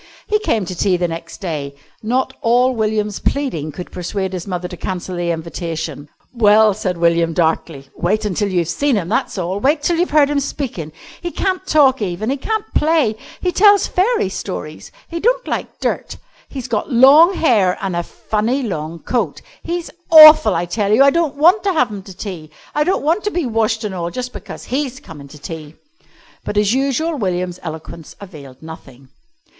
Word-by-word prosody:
He 425 - +1
came 225 - 0
to 185 - -5
tea 180 +1 +1
the 175 0 0
next 165 +3 -8
day. 145 -6 -4 0.3
Not 255 +4 -1
all 245 +3 +3
William's 215 -2 -1
pleading 170 - -2
could 175 +5 -9
persuade 190 +1 -4
his 180 +1 -5
mother 180 -1 -3
to 180 - -8
cancel 185 +1 -5
the 175 0 -2
invitation. 160 -3 -5 0.2
"Well," 215 -2 +5
said 185 -3 -3
William 170 -1 +2
darkly, 160 -4 -1
"wait 210 +5 0
till 205 -1 -1
you've 175 -3 0
seen 275 - 0
him, 180 -5 -2
that's 215 - -1
all. 185 +2 -2
Wait 290 +5 +1
till 340 +1 +1
you've 350 +2 +1
heard 290 -1 +3
him 290 - +1
speakin'. 240 - -5 0.3
He 345 - -3
can't 375 +1 -2
talk 270 -5 +4
even. 205 +4 -2
He 275 - -1
can't 435 +9 -2
play. 300 -8 +2 0.3
He 360 - 0
tells 405 +1 +5
fairy 405 - +1
stories. 155 -5 -7 0.2
He 335 - -5
don't - - +1
like - - -4
dirt. - - -3 0.3
He's 260 -3 -6
got 230 +4 -2
long 290 +9 +7
hair 210 - +2
an' 190 -2 -3
a 175 - 0
funny 220 +9 -2
long 165 -6 -5
coat. 245 -1 -2 0.2
He's 345 0 -4 0.2
awful, 310 - +9
I 170 +1 0
tell 200 +3 -1
you. 235 +6 +6
I 280 - +6
don't 330 -2 0
want 345 +8 +4
to 395 -1 0
have 250 -8 +1
him 205 -2 -6
to 190 -1 -13
tea. 175 -7 -7 0.2
I 300 - +2
don't 370 0 0
want 330 +7 +1
to - - +2
be 350 -6 -2
washed 225 -1 0
an' 205 - -4
all 170 -2 -3
just 250 +7 -6
because - - -9
he's 265 -1 -3
comin' 150 - -12
to 150 - -13
tea." 155 +1 -9 0.7
But 205 - -4
as 210 +1 +3
usual 280 +4 0
William's 180 -3 -2
eloquence 160 -1 -8
availed 145 -8 -12
nothing. 135 -5 -12
210 Hz, 190 wpm, -18 LUFS, 170-280 Hz, 0.7 s, awful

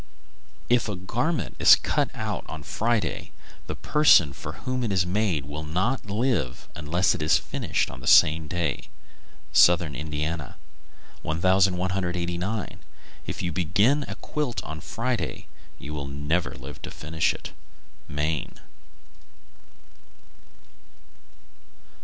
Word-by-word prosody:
If 120 -2 +2
a 105 - -2
garment 125 - -2
is - - +9
cut - - 0
out - - -3
on 80 -2 -7
Friday, 110 +8 -1 0.4
the - - -4
person 90 - +5
for 75 +1 -7
whom 130 +8 -3
it 115 - -1
is 95 -2 +2
made 90 -6 0
will 75 +2 -6
not 95 - -1
live 110 - -1
unless 80 +5 +1
it - - -5
is 80 +1 +4
finished - - -2
on - - -10
the 65 - -8
same 80 0 +6
day. 85 -4 -2 0.7
Southern 85 -4 +5
Indiana. 75 +1 -4 0.7
1189. 90 +2 0 0.5
If - - -4
you 85 - -1
begin 100 - +2
a - - -5
quilt 145 -6 -3
on 80 0 -6
Friday, 115 +8 -3 0.3
you 75 - -8
will 70 -2 -4
never 75 +5 -1
live 65 +3 -10
to - - -6
finish 80 +1 0
it. - - -8 0.6
_Maine. 75 +1 -2
85 Hz, 120 wpm, -26 LUFS, 75-105 Hz, 0.7 s, is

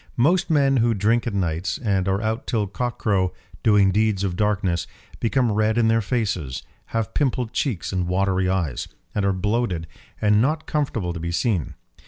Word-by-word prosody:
Most 175 +10 +3
men 140 -3 +3
who 115 -1 +2
drink 115 +5 +1
at 115 - -2
nights, 85 -3 -1
and 100 -5 0
are 95 +2 0
out 110 +3 -2
till 110 -3 0
cockcrow 100 -3 -1 0.3
doing 105 -3 +4
deeds 105 -1 +1
of 95 -3 -1
darkness, 100 -4 0 0.3
become 120 0 +1
red 110 +2 +1
in 115 -1 +4
their 115 0 +3
faces, 95 - -2 0.2
have 115 -1 -3
pimpled 125 -5 0
cheeks 115 - -2
and 90 -2 0
watery 95 0 +1
eyes, 85 -9 -1 0.3
and 105 - 0
are 100 - +3
bloated 95 -2 -1 0.3
and 105 0 +4
not 155 +5 0
comfortable 115 - -1
to 85 - -6
be 85 +1 -3
seen. 85 - 0
105 Hz, 175 wpm, -23 LUFS, 95-115 Hz, 0.3 s, doing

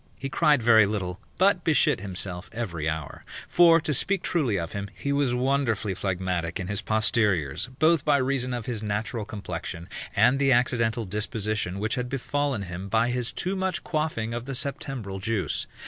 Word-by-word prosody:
He 135 - -5
cried 150 -4 +3
very 110 -3 +6
little, 95 -2 -3 0.2
but 185 -2 +3
beshit 155 -4 +3
himself 90 -1 -4
every 85 -10 -3
hour: 80 -2 -5 0.2
for, 170 -1 +6
to 150 - 0
speak 195 +7 +1
truly 135 - +1
of 85 -2 -3
him, 100 0 -5
he 140 +8 -2
was 140 -3 +1
wonderfully 125 -6 0
phlegmatic 90 -2 -2
in 95 - -3
his 100 +1 0
posteriors, 105 - +1
both 160 0 +4
by 145 -2 +4
reason 130 -1 0
of 120 -3 -3
his 115 -4 -3
natural 105 +1 -2
complexion 85 -4 -6 0.3
and 135 +2 +4
the 135 -1 +3
accidental 115 -2 +1
disposition 105 -1 -2
which 110 +3 -1
had 125 -1 -2
befallen 135 -3 -1
him 95 +1 -6
by 115 +3 +2
his 125 -1 -1
too 185 +2 -2
much 190 -1 -1
quaffing 150 -9 -2
of 120 0 -4
the 135 - -4
Septembral 125 -7 -3
juice. 110 -1 -1
115 Hz, 175 wpm, -26 LUFS, 100-135 Hz, 0.3 s, very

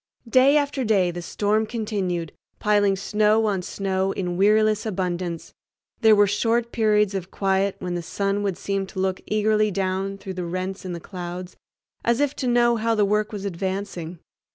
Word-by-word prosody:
Day 260 +4 +5
after 285 -2 0
day 195 -6 +2
the 175 0 -6
storm 210 +5 0
continued, 195 -8 -2 0.3
piling 205 -2 +2
snow 210 +3 +2
on 200 -3 0
snow 190 +1 -1
in 180 -2 -3
weariless 215 +2 +3
abundance. 180 -4 -3 0.5
There 220 -2 +6
were 205 0 +5
short 230 +4 0
periods 210 -3 +2
of 190 -2 -4
quiet, 195 0 0
when 180 -1 -4
the 175 - -2
sun 200 +4 -1
would 195 -3 -1
seem 195 0 -2
to 190 - -7
look 190 0 -1
eagerly 215 0 +2
down 195 0 -2
through 190 -1 -7
rents 185 +3 -4
in 180 - -4
the 170 - -5
clouds, 180 0 -7 0.5
as 235 +1 +2
if 290 -1 +1
to 260 - -2
know 240 -1 +3
how 225 +1 +1
the 210 -1 +3
work 210 +1 0
was 205 -2 -5
advancing. 185 -2 -4
200 Hz, 175 wpm, -24 LUFS, 185-215 Hz, 0.5 s, There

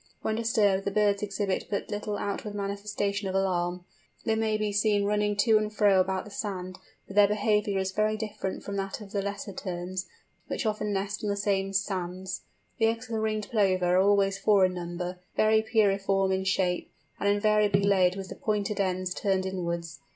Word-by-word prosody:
When 220 - 0
disturbed, 215 -4 +2
the - - 0
birds 205 0 +2
exhibit 200 -1 -1
but 200 - -3
little 205 0 -3
outward 205 +1 -4
manifestation 200 0 -2
of 190 - -3
alarm. 180 -2 0 0.4
They 225 - +2
may 220 -1 +1
be 215 -1 -1
seen 205 0 +2
running 210 0 +1
to 215 +1 +4
and 215 0 -2
fro 205 -3 +4
about 190 0 0
the 210 - -11
sand, 185 -3 -5 0.3
but 195 - -11
their 205 -1 +7
behaviour 210 -1 +1
is 190 0 -1
very 215 +2 +1
different 210 -3 -4
from 200 0 -4
that 195 0 -3
of 205 -3 -11
the 200 - -1
Lesser 200 0 -5
Terns, 185 0 -4 0.4
which - - -3
often 210 -1 -1
nest 200 +1 -2
on 210 - 0
the 200 - +1
same 195 -1 0
sands. 190 -1 -2 0.4
The 225 - +4
eggs 225 +1 -2
of - - -9
the 220 - 0
Ringed 215 -1 -1
Plover 185 -5 +2
are - - +6
always 195 0 +3
four 200 -2 +5
in 185 - 0
number, 175 +1 -5 0.2
very 220 0 +4
pyriform 195 -3 +2
in 190 0 -1
shape, 185 -2 0 0.3
and 200 - +1
invariably 205 -1 +3
laid 190 -2 +4
with 195 -1 -6
the - - -7
pointed 210 -1 -1
ends 185 -1 0
turned 190 -1 0
inwards. 170 -4 -3
200 Hz, 195 wpm, -28 LUFS, 190-210 Hz, 0.4 s, their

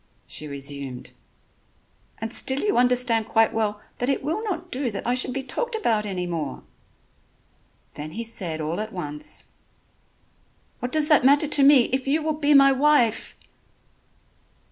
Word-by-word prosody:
She 150 - -6
resumed: 140 -2 -6 1.1
"And 225 +1 -5
still 265 +2 +1
you 415 - 0
understand 245 -2 +2
quite 225 0 +2
well 210 -2 -1 0.2
that 245 - -1
it 275 - -1
will 325 +10 -2
not 385 -7 -5
do 260 0 -1
that 200 -3 -6
I 240 - +1
should 255 +1 +2
be 270 +1 -4
talked 475 - -3
about 220 - 0
any 185 -3 -3
more." 160 -6 -5 1.3
Then 155 +1 -8
he 230 - -4
said 180 -8 -4
all 160 +4 -3
at 215 +1 -5
once: 150 -6 -5 1.3
"What 245 - -4
does 310 -1 +3
that 300 -4 +5
matter 285 +3 +4
to 295 - +5
me, 275 -1 +7
if 265 0 -1
you 305 +3 +1
will 310 0 0
be 295 -1 +2
my 275 0 +7
wife!" 270 -5 +2
245 Hz, 160 wpm, -24 LUFS, 190-285 Hz, 1.3 s, me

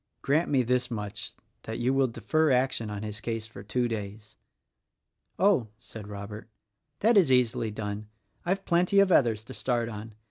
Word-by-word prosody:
Grant 155 +5 +2
me 135 -3 +3
this 125 +1 +1
much 105 -4 -5 0.3
that 110 - -5
you 125 +2 +1
will 135 -1 +3
defer 150 +8 +1
action 125 -3 +1
on 105 0 -5
his 110 0 -6
case 115 -2 -3
for 115 - -11
two 120 +4 0
days." 105 -1 -6 1.0
"Oh," 190 - +3
said 110 -3 -10
Robert, 105 +2 -8 0.5
"that 225 +1 +5
is 170 -9 +5
easily 125 -2 +2
done. 105 0 -5 0.4
I've 195 +2 -1
plenty 180 +3 +3
of 200 -1 +5
others 115 -9 +3
to 130 +3 -10
start 120 -3 -1
on. 110 0 -8
115 Hz, 170 wpm, -28 LUFS, 110-135 Hz, 1.0 s, that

